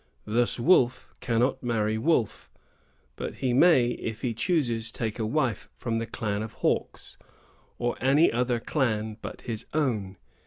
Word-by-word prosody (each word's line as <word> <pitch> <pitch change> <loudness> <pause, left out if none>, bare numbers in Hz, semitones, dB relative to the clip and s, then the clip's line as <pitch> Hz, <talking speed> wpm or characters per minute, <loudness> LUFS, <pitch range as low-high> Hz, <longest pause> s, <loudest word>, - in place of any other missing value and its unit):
Thus 120 +3 0
Wolf 130 -3 +3
cannot 125 +1 +1
marry 110 -3 0
Wolf; 125 -4 0 0.7
but - - -5
he 130 -2 -1
may, 130 -4 +5
if 115 -2 -5
he 120 -3 0
chooses, 120 - 0
take 115 -1 -4
a 110 - 0
wife 120 -3 -1
from 115 -2 -2
the 115 0 -2
clan 105 -2 -2
of 110 - -6
Hawks, - - -2 0.6
or 120 0 -1
any 140 +6 +4
other 120 0 0
clan 110 -5 -1
but - - -7
his 115 -2 -5
own. 110 -11 0
120 Hz, 150 wpm, -27 LUFS, 110-130 Hz, 0.7 s, may